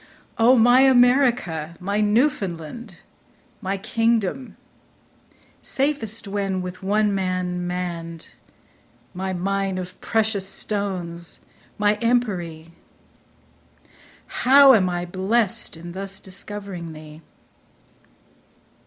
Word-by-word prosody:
O, 240 +3 +6
my 245 +3 +6
America, 245 - +3
my 200 +3 -1
Newfoundland, 210 - -1 0.7
My 195 +1 -2
kingdom, 225 +3 -1 1.0
safest 230 -6 -2
when 195 -2 -2
with 180 0 -7
one 205 +2 +1
man 185 -2 -2
mann'd, 170 -2 -5 0.8
My 190 +1 -3
mine 195 +1 -1
of 185 0 -7
precious 215 -4 0
stones, 185 -4 -4 0.4
my 210 0 +2
empery; 180 -10 -1 1.5
How 275 +1 +6
am 190 -6 +3
I 175 0 -2
blest 190 +1 -1
in 170 +1 -9
thus 195 +1 -6
discovering 190 -3 -8
thee 155 0 -12
195 Hz, 90 wpm, -23 LUFS, 180-225 Hz, 1.5 s, O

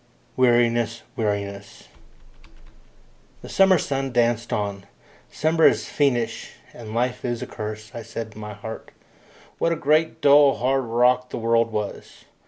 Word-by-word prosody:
Weariness! 120 -2 +2
Weariness! 100 -2 -4 1.6
The - - -9
summer 190 -1 +5
sun 135 -3 -2
danced 120 -1 +1
on. 100 -2 -3 0.4
Summer 160 +2 +3
is - - +1
fiendish, 125 -6 -1 0.2
and 110 -2 -9
life 125 +1 -1
is 120 -2 -3
a - - -4
curse, 110 +1 -7
I 115 - -6
said 115 0 -7
in 110 - -11
my 105 0 -7
heart. 110 +2 -9 0.7
What 165 - +1
a - - +1
great 155 +1 +1
dull 145 -1 +6
hard 135 +1 0
rock 125 +2 +2
the - - -5
world 115 0 +1
was! 105 -2 -6
120 Hz, 140 wpm, -23 LUFS, 110-135 Hz, 1.6 s, dull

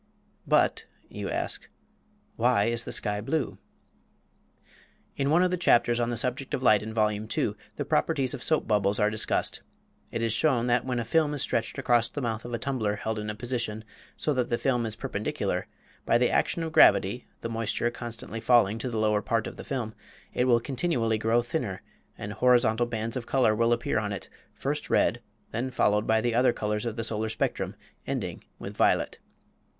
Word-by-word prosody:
"But," - - +2 0.2
you - - -5
ask, - - -2 0.7
"why 120 -3 +3
is 115 0 -1
the - - -5
sky 105 -1 0
blue?" 135 +4 -2 1.6
In 140 0 0
one 165 +4 +4
of 180 - +2
the 180 - 0
chapters 120 -7 +3
on 120 0 +1
the 120 - -1
subject 125 +4 -2
of 130 - -5
light 110 -5 +5
in 110 +1 -6
Vol. 110 -1 +2
II. 105 +1 -5 0.5
the - - -3
properties 135 - +1
of 135 - -6
soap 155 +3 +1
bubbles 105 -1 +2
are 105 0 +3
discussed. 110 - 0 0.5
It 115 - -2
is 115 -1 +1
shown 120 -1 +2
that 125 0 +2
when 125 -1 -1
a 120 - -1
film 150 +2 +2
is 140 - +1
stretched 115 - -1
across 120 -1 +3
the - - -5
mouth 115 -4 -3
of 120 - -6
a 120 - -1
tumbler 115 -6 -1
held 110 +1 -3
in 105 0 -4
a 105 - -4
position 115 -1 -3 0.3
so 150 - 0
that 125 -2 0
the 120 - +1
film 120 -3 0
is 110 - -4
perpendicular, - - -2 0.4
by 115 - +3
the 125 0 +2
action 170 - +1
of 160 - -3
gravity 120 -5 +5
(the 115 - -4
moisture 115 +1 -1
constantly 115 -1 -6
falling 115 -3 +4
to 125 - -3
the 115 - -3
lower 105 -1 +2
part 115 0 0
of - - -6
the - - -8
film) 120 -5 -3 0.4
it 125 - +1
will 120 -2 +4
continually 120 -4 0
grow 115 +2 +2
thinner, 120 - -3 0.3
and - - -5
horizontal 120 -2 +3
bands 115 -1 -3
of 125 -3 -4
color 125 -5 +3
will 115 +2 +2
appear 115 -1 +1
upon 105 -2 -2
it, 95 - -7 0.2
first - - -3
red, - - +2 0.3
then 125 +3 -2
followed 105 -4 +1
by 110 0 +3
the 120 0 0
other 125 +1 +4
colors 105 +2 -2
of 115 - -3
the 115 - -3
solar 110 -1 -1
spectrum, - - -2 0.3
ending - - -3
with - - -8
violet. - - +2
115 Hz, 195 wpm, -27 LUFS, 110-125 Hz, 1.6 s, light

